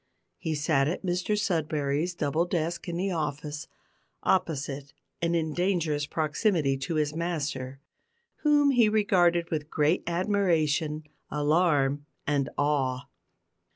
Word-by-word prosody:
He 160 -3 -2
sat 145 -2 +2
at 180 +4 -3
Mr 180 +4 0
Sudberry's 160 -4 0
double 155 +1 0
desk 170 0 -2
in 170 - -3
the 190 +2 -1
office, 150 -2 -3 0.6
opposite 145 -6 -1 0.3
and 170 0 +1
in 160 -2 0
dangerous 165 -5 0
proximity 155 -1 +1
to 145 +5 -3
his 150 -1 +1
master, 140 -6 -3 0.6
whom 290 -2 +4
he 240 -5 +5
regarded 175 -5 +3
with 155 -2 -2
great 155 +4 +2
admiration, 170 -5 +1 0.3
alarm, 145 -2 +2 0.2
and 140 -2 0
awe. 140 -2 0
160 Hz, 120 wpm, -28 LUFS, 145-175 Hz, 0.6 s, he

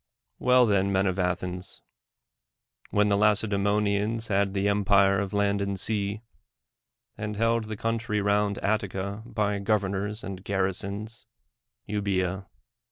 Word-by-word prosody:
Well 125 0 +5
then, 100 -2 +2
men 95 0 +2
of 95 0 -1
Athens 90 0 -3 0.5
— - - -34
when 105 0 +2
the 100 - +3
Lacedae 105 0 +2
monians 105 +2 0
had 100 0 +1
the 100 +1 +1
empire 100 -1 +3
of 100 -2 -2
land 100 -1 +1
and 100 -1 -2
sea, 105 +1 -1 1.0
and 105 0 -3
held 115 +1 +1
the 110 -1 -6
country 115 0 -1
round 100 0 +1
Attica 100 -1 -1
by 105 -3 -1
governors 100 +1 -1
and 95 -1 -7
gar 95 -1 0
risons, 100 +4 -4 0.6
Euboca. 95 -2 -1
100 Hz, 135 wpm, -27 LUFS, 100-105 Hz, 1.0 s, Well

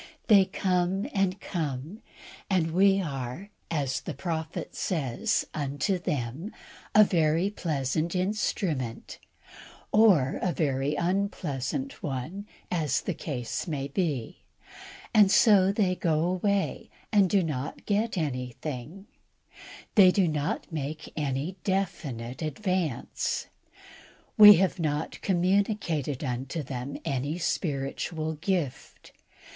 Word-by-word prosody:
They 200 -3 +7
come 185 +2 0
and 195 -1 +1
come, 155 - -4 0.5
and 175 -4 +1
we 195 +3 +4
are, 145 +3 -5 0.2
as 140 -5 -1
the - - -6
Prophet 160 -2 -4
says, 140 -10 -1
unto 145 +6 -1
them 145 - -3 0.4
a 215 - +9
very 170 0 +2
pleasant 155 -1 -1
instrument, 180 - -2 0.7
or 190 -12 +4
a 180 - 0
very 140 -1 0
unpleasant 190 - -2
one, 155 +6 -4 0.2
as 155 -7 +1
the - - -2
case 125 0 -4
may 140 -4 -3
be; 140 -6 -2 0.7
and 210 -3 +7
so 195 -2 +6
they 200 -3 +1
go 160 -4 0
away, 190 +3 0 0.2
and 200 -3 +4
do 195 -1 +3
not 145 -4 -4
get 210 +1 0
anything. 140 - -4 0.9
They 195 -3 +8
do 185 -1 +3
not 150 +1 -2
make 155 0 -5
any 145 +5 -2
definite 150 - -2
advance. 175 - -2 0.9
We 210 -1 +11
have 185 +1 +1
not 150 -1 -2
communicated 180 - 0
unto 135 +4 -3
them 130 +1 -5
any 140 +4 -1
spiritual 155 0 -2
gift. 160 -4 -3
165 Hz, 110 wpm, -28 LUFS, 140-195 Hz, 0.9 s, We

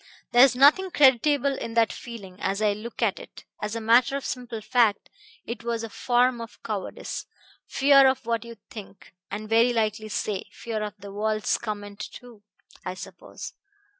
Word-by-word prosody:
There's 250 +1 +6
nothing 295 +9 +5
creditable 280 -1 +4
in 230 -3 -6
that 230 -1 +3
feeling, 200 -6 -10
as 195 +1 -1
I 210 -1 +2
look 230 +3 -6
at 210 -4 +1
it; - - -13 0.2
as 210 +1 -3
a - - -2
matter 240 +4 +4
of 280 - -7
simple 245 -4 -4
fact, 220 -2 +1 0.3
it 235 0 -6
was 235 -1 -2
a 225 - -6
form 245 +1 +2
of 230 - -9
cowardice 205 -4 -5 0.4
fear 275 0 +6
of 260 -1 0
what 230 -1 -1
you 235 - -11
would - - -25
think, 200 -4 -11 0.2
and 210 +2 -5
very 230 +2 +4
likely 215 -1 -1
say 210 -2 -2
fear 225 -2 -5
of 210 -1 -4
the 200 0 -10
world's 215 +1 0
comment 205 -2 -6
too, 235 0 -10 0.4
I 185 0 -4
suppose. - - -9
230 Hz, 175 wpm, -26 LUFS, 210-245 Hz, 0.4 s, There's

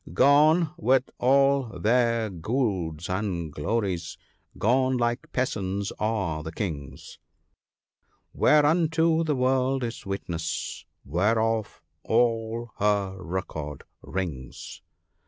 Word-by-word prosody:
" - - -14
" - - -11
Gone, 150 - +5
with 130 -5 +2
all 135 -4 +3
their 115 +2 +2
gauds 90 - -2
and 90 -5 -2
glories: 95 0 -2 0.4
gone, 130 +3 +2
like 120 0 -1
peasants, 100 -6 -2
are 100 -8 -1
the 80 +1 -6
Kings, 80 -7 -6 1.1
Whereunto 160 +2 +3
the 155 -3 0
world 130 +1 +1
is 115 -1 -5
witness, 90 -5 -4 0.2
whereof 110 +7 0 0.2
all 115 0 0
her 100 -2 +1
record 80 -5 -5 0.2
rings." 75 -10 -6
110 Hz, 100 wpm, -26 LUFS, 90-130 Hz, 1.1 s, Gone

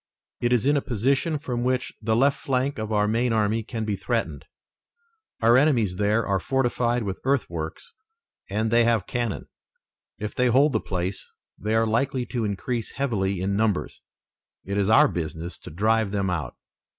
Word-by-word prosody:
"It 120 - 0
is 125 -1 +2
in 145 +1 +4
a 140 - +2
position 135 +7 0
from 125 -5 -3
which 125 0 -1
the 110 0 +1
left 140 +4 +3
flank 135 +1 -1
of 110 0 -4
our 105 -1 +2
main 115 +3 +1
army 110 0 +1
can 110 0 -4
be 105 -2 -1
threatened. 100 - -2 1.0
Our 115 +2 +6
enemies 120 -11 +2
there 105 +3 +2
are 100 -1 +1
fortified 120 0 0
with 95 -2 -4
earthworks 85 - -2 0.6
and 110 +3 -1
they 120 0 +5
have 115 -5 +2
cannon. 120 -2 -3 0.7
If 105 0 -5
they 125 - +2
hold 135 +4 +4
the - - +2
place 90 +1 -4 0.2
they 110 +2 -2
are 115 0 +3
likely 125 +3 0
to 120 -3 -2
increase 110 +3 -3
heavily 100 -9 -1
in 100 +1 0
numbers. 105 -2 -1 0.6
It 100 - -3
is 100 +1 +1
our 110 - +7
business 85 -1 -5
to - - -10
drive 110 +5 +1
them 100 -2 -1
out." 85 -4 -3
110 Hz, 175 wpm, -25 LUFS, 100-125 Hz, 1.0 s, our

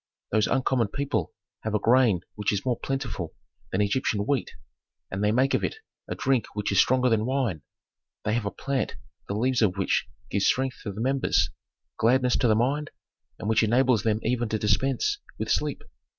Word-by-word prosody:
"Those 110 -1 +3
uncommon 130 -3 +1
people 140 +6 -2 0.3
have 110 -1 -2
a - - +2
grain 115 -5 +4
which 105 -1 -1
is 100 +1 -2
more 125 -3 0
plentiful 130 - -3 0.4
than 95 - +1
Egyptian 105 0 +1
wheat, 135 +5 0 0.6
and 95 +2 -2
they 105 - +3
make 130 +4 +2
of - - +1
it - - -1 0.3
a - - -3
drink 130 -4 +1
which 105 -1 -1
is 100 - +3
stronger 130 0 +4
than 110 -3 +2
wine. 125 - 0 0.6
They 105 - +1
have 115 -3 0
a - - +1
plant 135 +6 -2 0.3
the 100 - -2
leaves 125 +3 +1
of 100 -3 +2
which 100 +1 +1 0.2
give 100 - +1
strength 130 +5 +1
to 100 - -4
the 100 +3 -6
members, 135 +2 +2 0.5
gladness 125 +3 +3
to 125 - +2
the 110 - +4
mind, 140 +7 0 0.5
and - - -5
which 110 0 +3
enables 120 +1 +3
them 110 -1 +1
even 120 0 0
to 110 - 0
dispense 135 - +1 0.2
with - - -2
sleep. - - 0
115 Hz, 190 wpm, -26 LUFS, 105-130 Hz, 0.6 s, grain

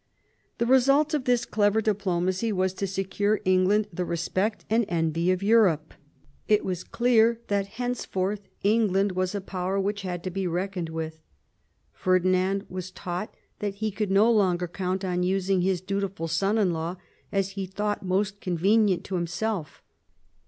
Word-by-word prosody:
The 235 - +1
result 275 +5 +4
of 290 -4 0
this 245 -1 +2
clever 210 0 +2
diplomacy 195 -1 0
was 185 -1 0
to 195 +1 -3
secure 195 +2 0
England 185 +3 +3
the 180 - -2
respect 185 +5 -2
and 225 +2 +2
envy 165 0 0
of 185 +1 -1
Europe. 195 -8 +3 0.5
It 210 -1 +3
was 185 -2 -3
clear 235 -1 +3
that 200 -1 0
henceforth 205 -5 -2 0.2
England 205 -2 +3
was 185 +1 -1
a 200 - -2
power 190 0 -2
which 205 +1 -1
had 180 -2 -4
to 185 - -3
be 190 0 -2
reckoned 180 0 -2
with. 160 -1 -5 0.7
Ferdinand 185 +2 +1
was. 185 0 -6
taught 185 +2 -5 0.2
that 205 -1 -3
he 215 +1 -2
could 205 +1 -2
no 205 +4 +5
longer 180 -5 +2
count 185 +2 -3
on 180 -1 -1
using 190 0 +1
his 185 -1 +1
dutiful 195 -3 -3
son 195 +7 +1
in 195 -5 +2
law 165 +2 -3 0.4
as 195 -1 0
he 195 -1 -4
thought 205 +2 -2
most 195 +2 -1
convenient 190 +1 +2
to 195 - -8
himself. 175 +1 -3
195 Hz, 160 wpm, -26 LUFS, 180-210 Hz, 0.7 s, no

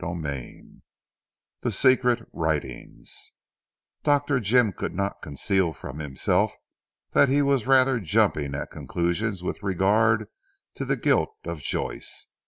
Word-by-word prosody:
CHAPTER 85 -2 -4
X 65 -3 -8 0.9
THE 120 - -1
SECRET 125 +1 +3
WRITINGS 75 -6 -4 0.7
Dr. 145 -2 +2
Jim 115 -1 +3
could - - -4
not 100 +1 -2
conceal 85 +4 0
from 70 0 -8
himself, 70 -4 0 0.6
that 140 - +5
he 145 +2 +3
was 140 -4 +1
rather 130 -1 +5
jumping 75 -6 +1
at 70 - -5
conclusions 90 +3 -2
with 90 - -4
regard 105 +3 +2 0.5
to - - -5
the - - 0
guilt 435 - +1
of - - -5
Joyce. - - -4
100 Hz, 125 wpm, -25 LUFS, 80-125 Hz, 0.9 s, that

